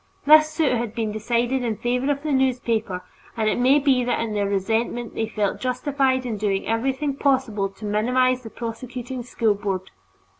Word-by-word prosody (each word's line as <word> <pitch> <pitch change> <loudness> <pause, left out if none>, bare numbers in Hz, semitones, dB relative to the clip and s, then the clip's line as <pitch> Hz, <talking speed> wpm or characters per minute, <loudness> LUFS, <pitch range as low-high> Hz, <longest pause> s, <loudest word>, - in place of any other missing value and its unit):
This 310 +1 +7
suit 310 -1 +1
has 245 - +1
since 220 - -11
been 220 -2 -1
decided 240 +4 0
in 230 -2 -1
favor 250 +3 0
of 280 0 -3
the 305 - -2
newspaper, 235 -8 0 0.3
and 220 -1 +1
it 215 - +1
may 260 +3 +5
be 270 -3 +3
that 245 0 0
in 225 -2 -2
their 205 -1 0
resentment 225 +4 -1
they 220 - -2
felt 210 -2 -1
justified 260 0 0
in 225 -3 -3
doing 200 -2 -1
everything 265 +5 -1
possible 255 -8 +1
to 195 +2 -11
minimize 250 +5 +2
the 225 - -9
prosecuting 245 +2 -6
School 230 -2 +1
Board. 195 -2 -4
240 Hz, 185 wpm, -23 LUFS, 215-260 Hz, 0.3 s, This